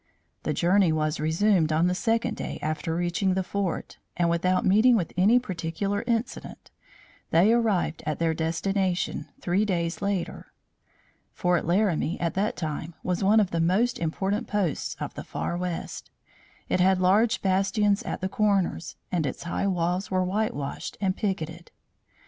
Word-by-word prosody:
The -, -, -1 dB
journey 180 Hz, 0 st, +3 dB
was 155 Hz, 0 st, 0 dB
resumed 160 Hz, +1 st, +2 dB
on 160 Hz, +2 st, +3 dB
the 180 Hz, -, +2 dB
second 225 Hz, +5 st, 0 dB
day -, -, -5 dB
after 155 Hz, +1 st, -2 dB
reaching 175 Hz, +2 st, 0 dB
the 190 Hz, -, 0 dB
fort, 195 Hz, -1 st, -3 dB, 0.2 s
and 170 Hz, -1 st, +2 dB
without 180 Hz, +2 st, +1 dB
meeting 220 Hz, +6 st, +5 dB
with 180 Hz, -7 st, -1 dB
any 200 Hz, +7 st, +5 dB
particular 200 Hz, -2 st, -2 dB
incident 235 Hz, 0 st, -3 dB, 0.6 s
they 190 Hz, +7 st, +5 dB
arrived 210 Hz, -9 st, +1 dB
at 155 Hz, -, -1 dB
their 165 Hz, -1 st, +1 dB
destination, 180 Hz, +3 st, -1 dB
three 185 Hz, +4 st, +1 dB
days 170 Hz, -5 st, -1 dB
later. 200 Hz, -3 st, -3 dB, 0.8 s
Fort 180 Hz, -2 st, +1 dB
Laramie, 175 Hz, -1 st, +1 dB
at 170 Hz, -1 st, -1 dB
that 205 Hz, +3 st, 0 dB
time, 160 Hz, 0 st, -4 dB
was 180 Hz, +1 st, -1 dB
one 210 Hz, +3 st, +5 dB
of 195 Hz, -3 st, +1 dB
the 165 Hz, -, 0 dB
most 210 Hz, +9 st, +2 dB
important 195 Hz, +7 st, -1 dB
posts 200 Hz, -7 st, -1 dB
of -, -, -4 dB
the -, -, -7 dB
far -, -, -3 dB
west. 180 Hz, -1 st, -4 dB, 0.6 s
It -, -, 0 dB
had 185 Hz, +1 st, +4 dB
large 205 Hz, +5 st, +3 dB
bastions 200 Hz, +2 st, +2 dB
at -, -, -5 dB
the 185 Hz, -, 0 dB
corners, 195 Hz, -4 st, 0 dB, 0.2 s
and 165 Hz, -5 st, 0 dB
its 130 Hz, -, -5 dB
high 175 Hz, +3 st, -1 dB
walls 180 Hz, 0 st, 0 dB
were 185 Hz, -1 st, +1 dB
whitewashed 185 Hz, -8 st, -3 dB
and 190 Hz, -2 st, 0 dB
picketed. 170 Hz, -5 st, -3 dB
185 Hz, 155 wpm, -26 LUFS, 170-200 Hz, 0.8 s, meeting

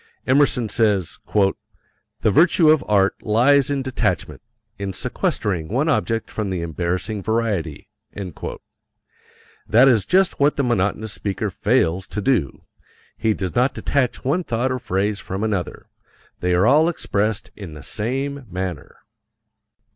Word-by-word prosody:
Emerson 130 Hz, -3 st, +3 dB
says, 100 Hz, -5 st, +1 dB, 1.0 s
"The 110 Hz, -, +3 dB
virtue 160 Hz, -, +5 dB
of 155 Hz, -4 st, +3 dB
art 100 Hz, -2 st, +2 dB
lies 130 Hz, +6 st, +3 dB
in 140 Hz, -2 st, -1 dB
detachment, 130 Hz, -1 st, -2 dB, 0.4 s
in 100 Hz, -1 st, -4 dB
sequestering 90 Hz, -3 st, -1 dB
one 130 Hz, -, 0 dB
object 115 Hz, -7 st, 0 dB
from 105 Hz, -3 st, -3 dB
the 90 Hz, -3 st, -3 dB
embarrassing 90 Hz, +5 st, -2 dB
variety." 105 Hz, -8 st, -2 dB, 1.8 s
That 120 Hz, +6 st, +6 dB
is 110 Hz, -8 st, +3 dB
just 190 Hz, 0 st, +2 dB
what 145 Hz, +1 st, +3 dB
the 140 Hz, -, 0 dB
monotonous 110 Hz, -2 st, 0 dB
speaker 100 Hz, 0 st, -3 dB
fails 95 Hz, -4 st, +1 dB
to 105 Hz, -, -5 dB
do 105 Hz, -, 0 dB, 0.5 s
he 110 Hz, -1 st, 0 dB
does 95 Hz, -3 st, -4 dB
not 125 Hz, +3 st, +1 dB
detach 130 Hz, -4 st, -1 dB
one 160 Hz, +7 st, +1 dB
thought 125 Hz, -1 st, -1 dB
or 130 Hz, -, -2 dB
phrase 100 Hz, -2 st, -1 dB
from 95 Hz, +3 st, -5 dB
another, 100 Hz, -6 st, -3 dB, 0.5 s
they 90 Hz, 0 st, +1 dB
are 90 Hz, +3 st, +3 dB
all 150 Hz, +7 st, +5 dB
expressed 105 Hz, -, -2 dB
in 90 Hz, -7 st, -9 dB
the 75 Hz, -, -10 dB
same 135 Hz, -, -3 dB
manner. 90 Hz, -4 st, -6 dB
110 Hz, 135 wpm, -21 LUFS, 95-130 Hz, 1.8 s, That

